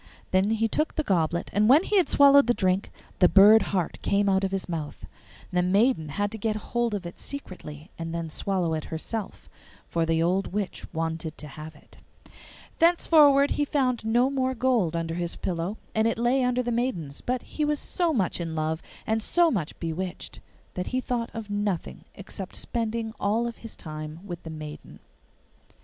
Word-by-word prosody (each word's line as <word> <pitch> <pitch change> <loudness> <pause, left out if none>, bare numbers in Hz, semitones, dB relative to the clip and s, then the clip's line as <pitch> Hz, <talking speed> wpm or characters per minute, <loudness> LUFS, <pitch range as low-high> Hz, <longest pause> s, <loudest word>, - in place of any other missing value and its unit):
Then 190 +2 +3
he 225 0 +1
took 305 +8 -1
the 310 - 0
goblet, 170 - 0
and 210 +3 +3
when 295 +7 +7
he 415 - +1
had 365 - +3
swallowed 280 -2 +6
the 240 - +3
drink 185 +1 +1 0.3
the 180 - +6
bird 210 +2 +8
heart 185 -4 -1
came 200 0 +1
out 190 0 +2
of 195 - +1
his 195 -1 -3
mouth. 160 -4 -5 0.5
The 180 -1 +2
maiden 195 - +2
had 205 +7 -1
to 220 - -6
get 215 +1 -1 0.2
hold 240 -2 +1
of 190 -3 -5
it 170 - -8
secretly 175 - -8
and 165 0 -4
then 165 0 -3
swallow 175 +1 -1
it 155 -1 -3
herself, 200 +6 -5 0.4
for 165 - 0
the 165 0 +1
old 185 +3 0
witch 205 -2 -4
wanted 160 -1 -3
to 150 - -8
have 155 +2 -9
it. - - -20 0.8
Thenceforward 300 -4 +5
he 295 - +1
found 260 -5 0
no 240 +4 +2
more 260 -1 0
gold 230 -9 +1
under 165 -1 -2
his 170 0 -3
pillow, 175 +4 -3 0.2
and 220 +1 +2
it 230 - 0
lay 245 +3 +2
under 250 0 +1
the 240 - -2
maiden's; 190 - -2
but 250 0 -2
he 305 - -4
was 295 0 +1
so 345 +3 0
much 195 - 0
in 165 -1 -4
love 155 +1 -1 0.2
and 220 0 0
so 340 +8 +3
much 175 - -3
bewitched 175 +2 -5 0.3
that 180 - -4
he 255 - -1
thought 245 -2 -2
of 220 -2 -6
nothing 205 -4 -3
except 195 -1 -8
spending 225 -1 -3
all 215 +4 +1
his 230 -1 -10
time 155 0 -7
with 175 -3 -6
the 160 - -9
maiden. 155 -1 -9
200 Hz, 190 wpm, -26 LUFS, 170-240 Hz, 0.8 s, bird